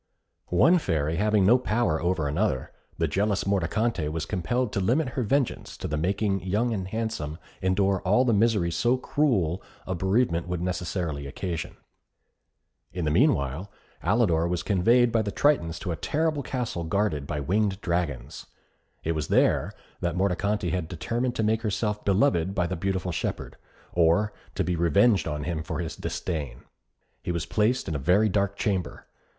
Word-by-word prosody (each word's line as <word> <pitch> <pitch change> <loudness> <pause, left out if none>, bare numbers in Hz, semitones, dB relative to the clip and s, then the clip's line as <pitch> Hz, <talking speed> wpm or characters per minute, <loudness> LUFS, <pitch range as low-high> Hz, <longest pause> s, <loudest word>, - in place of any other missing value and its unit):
One 165 - +4
Fairy 80 - -1
having 105 0 +3
no 120 +6 +6
power 110 -9 0
over 85 -4 0
another, 75 - -1 0.3
the - - +1
jealous 100 0 0
Mordicante 100 -1 0
was 80 0 -3
compelled 110 +6 -1
to - - 0
limit 125 +9 +1
her 130 - -3
vengeance 130 +3 -1
to - - -4
the 75 - -2
making 95 +4 0
Young 105 +6 0
and 95 -3 -3
Handsome 110 -8 -3 0.2
endure 95 0 +2
all 105 +8 +3
the 120 - +3
misery 105 -5 +2
so 120 +10 +2
cruel 105 - +1 0.2
a 95 - -2
bereavement 95 -1 +1
would 90 -1 -2
necessarily 85 -4 -3
occasion. 85 +4 -5 1.1
In 90 -3 -3
the 75 - +1
meanwhile 70 +7 +1 0.3
Alidor 85 -4 +2
was 90 -1 -1
conveyed 115 +5 +3
by 115 0 +2
the 100 -1 -3
Tritons 90 - +2
to 90 - -3
a - - -1
terrible 155 - 0
castle 125 -10 -3
guarded 80 -5 -1
by 75 - -2
winged 95 +6 0
dragons. 85 -7 -3 0.6
It 80 - 0
was 80 -1 -2
there - - +2 0.3
that 85 0 -1
Mordicante 100 0 0
had 90 -3 -2
determined 115 +10 -2
to 110 - 0
make 110 +1 +1
herself 105 -1 -1
beloved 95 - +2
by 90 - +1
the 90 +2 -2
beautiful 95 +1 -2
shepherd, 80 - -4 0.4
or 90 +5 +3 0.2
to - - +1
be 90 - -1
revenged 85 +6 +3
on 75 -2 -3
him 85 -1 -2
for 80 0 -4
his 80 -1 -4
disdain. 70 -9 -4 0.6
He - - -3
was 85 -1 -2
placed 110 +8 +1
in - - -2
a 75 - -2
very 95 +10 +3
dark 100 0 0
chamber. 95 -3 -2
95 Hz, 165 wpm, -26 LUFS, 85-110 Hz, 1.1 s, no